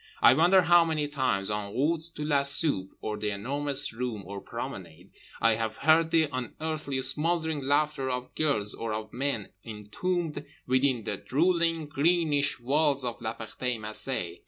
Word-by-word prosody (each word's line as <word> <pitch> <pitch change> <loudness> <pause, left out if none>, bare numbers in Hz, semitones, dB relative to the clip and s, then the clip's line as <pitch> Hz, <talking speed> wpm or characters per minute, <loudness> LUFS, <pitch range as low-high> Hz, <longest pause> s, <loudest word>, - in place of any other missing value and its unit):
I 120 - +7
wonder 180 +6 +5
how 175 0 +6
many 155 -3 -1
times, 130 -9 0
en 105 -1 -4
route 155 +5 +1
to 150 - -4
la 145 -2 +3
soupe 140 - 0
or 105 0 -3
The 105 - -2
Enormous 140 +6 -1
Room 115 -3 -4
or 100 +1 -7
promenade, 95 -8 -8 0.3
I 115 - +4
have 110 0 -2
heard 160 +1 +4
the 160 -1 +3
unearthly 140 +2 -3
smouldering 160 +3 0
laughter 145 0 +1
of 125 0 -4
girls 135 -10 0
or 115 -1 -4
of 110 0 -5
men 125 -5 -2
entombed 145 - -3 0.2
within 130 -2 +2
the 105 - -3
drooling 165 - +1
greenish 150 -1 +1
walls 140 +1 +1
of 120 -1 -4
La 110 0 -3
Ferté 115 +2 -4
Macé. 105 -4 -4
135 Hz, 155 wpm, -28 LUFS, 110-155 Hz, 0.3 s, I